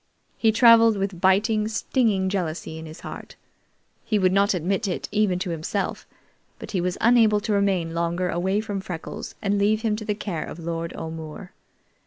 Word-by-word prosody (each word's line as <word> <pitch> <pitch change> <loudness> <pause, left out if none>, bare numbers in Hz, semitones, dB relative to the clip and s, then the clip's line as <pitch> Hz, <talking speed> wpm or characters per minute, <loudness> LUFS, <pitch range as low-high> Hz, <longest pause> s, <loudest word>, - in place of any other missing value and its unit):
He 225 - +3
traveled 230 -1 +6
with 195 -3 -3
biting, 210 +3 +3
stinging 215 -2 +1
jealousy 170 -4 -3
in 160 - -8
his 155 - -11
heart. - - -9 0.7
He 215 - 0
would 185 -2 +3
not 200 0 +3
admit 185 +4 -1
it 180 - -3
even 205 -3 +2
to 180 -1 -3
himself, 170 +5 -3 0.5
but - - -9
he 185 - 0
was 180 0 -2
unable 225 -3 +4
to 215 0 -1
remain 190 -5 +1
longer 170 +2 -1
away 190 +4 0
from 205 -3 -4
Freckles 175 -4 -7
and 200 0 +1
leave 215 +2 +2
him 220 -2 +1
to 215 - -7
the 210 - -1
care 185 -6 -4
of - - -8
Lord 165 0 -4
O'More. 160 +3 -7
195 Hz, 180 wpm, -24 LUFS, 175-215 Hz, 0.7 s, traveled